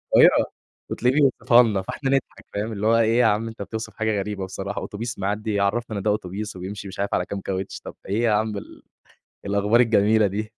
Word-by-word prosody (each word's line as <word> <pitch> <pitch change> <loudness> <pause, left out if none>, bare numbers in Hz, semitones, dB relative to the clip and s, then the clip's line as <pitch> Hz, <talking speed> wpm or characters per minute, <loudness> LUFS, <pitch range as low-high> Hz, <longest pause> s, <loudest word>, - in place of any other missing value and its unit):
القاهرة - - +6 0.4
وتلاقيه 125 +3 +1
بيوصفها 125 -4 +5
لنا 105 -4 0
فإحنا 135 +8 -4
نضحك 135 -1 -1
فاهم، 105 +2 -2
اللي 105 +1 -2
هو 115 0 +5
إيه 115 +2 +3
يا 120 - +5
عم 110 +1 +1
بتوصف 110 +2 -6
حاجة 110 -2 0
غريبة 100 -1 -3
بصراحة، 95 +2 -5
أوتوبيس 115 +2 -5
معدّي 105 +2 -2
يعرفنا 105 +2 0
إن 95 - -4
ده 105 - +1
أوتوبيس 105 +1 -4
وبيمشي 100 +3 -6
مش 95 - -9
عارف 100 - -1
على 90 - +1
كام 100 -1 -5
كاوتش، 95 0 -4
طَب - - -10
إيه 105 +4 -1
يا 115 - +3
عم 105 0 0
ال - - -11 0.6
الأخبار 100 +4 +3
الجميلة 110 -2 +4
دي. 105 +3 -4
105 Hz, 205 wpm, -23 LUFS, 100-115 Hz, 0.6 s, القاهرة